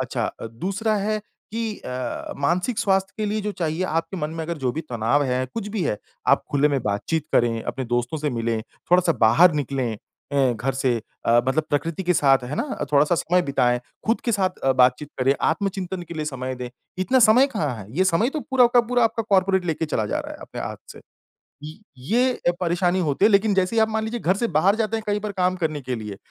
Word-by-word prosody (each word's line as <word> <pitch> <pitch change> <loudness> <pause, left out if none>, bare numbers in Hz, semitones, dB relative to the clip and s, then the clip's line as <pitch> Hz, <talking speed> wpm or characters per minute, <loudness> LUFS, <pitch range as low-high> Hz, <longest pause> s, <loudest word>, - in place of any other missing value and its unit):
अच्छा - - -2 0.2
दूसरा 195 - -1
है 215 +2 0 0.3
कि 225 -2 -3
अ, 125 -1 -5
मानसिक 180 - 0
स्वास्थ्य 195 -1 +1
के 215 - -2
लिए 215 +1 -1
जो 210 0 -3
चाहिए, 165 -2 -2
आपके 165 +2 -2
मन 150 -3 -3
में 165 0 -4
अगर 170 0 -4
जो 130 -3 -1
भी 160 - -3
तनाव 120 +5 +1
है, 130 0 0
कुछ 220 -3 -4
भी 210 -2 -2
है, 105 - 0 0.3
आप - - +4
खुले 145 +1 +3
में 140 -2 0
बातचीत 130 +10 -1
करें, 115 -1 +2
अपने 130 -1 -4
दोस्तों 120 +5 -1
से 150 0 -1
मिलें, 115 -2 -1 0.3
थोड़ा-सा 180 -1 +5
बाहर 140 +11 +6
निकलें 135 -4 -1 0.4
अ, 135 -3 +3
घर 125 +3 -2
से 130 -2 +1 0.3
अ, 120 +1 +5
मतलब 155 +4 +2
प्रकृति 165 +5 -1
के 180 0 +2
साथ 135 -4 +4
है 130 +4 -4
ना? 285 - -2 0.2
थोड़ा-सा 150 +4 +4
समय 180 +2 +1
बिताएँ, 125 -5 +1 0.3
खुद 225 +2 +2
के 235 - +1
साथ 190 -3 0
अ, 135 - +4
बातचीत 130 +3 +3
करें, 135 +2 +3
आत्मचिंतन 185 +1 -1
के 170 - -7
लिए 155 -1 -3
समय 130 -3 -4
दें, 125 -1 -6 0.3
इतना 185 +8 +2
समय 250 +5 +6
कहाँ 145 -5 -1
है? 100 -3 -9
ये 185 - +4
समय 190 +5 +2
तो 305 - -3
पूरा 265 -3 +3
वक़्त 240 -1 +3
पूरा 245 -1 +3
आपका 225 0 0
कॉर्पोरेट 190 -1 +3
लेके 160 -1 -1
चला 110 -8 -1
जा - - -1
रहा - - -8
है, - - -10
अपने - - -8
हाँथ - - -4 0.2
से। - - -13 0.6
ये 155 +5 -9 0.2
ये, 240 - +1
अ, - - +6
परेशानी 175 +1 +1
होती 150 +3 +2
है, 220 - +5
लेकिन 200 +1 +4
जैसे 190 +4 +2
आप 220 0 +3
मान 220 0 -1
लीजिए 225 +2 -3
घर 185 -2 +1
से 235 - 0
बाहर 180 +4 +3
जाते 225 0 -1
हैं 220 - -6
कहीं 205 0 +1
पर 210 0 -4
काम 185 -1 +1
करने 155 -4 -2
के 130 -1 -3
लिए, 105 -3 -7
165 Hz, 230 wpm, -23 LUFS, 135-200 Hz, 0.6 s, बाहर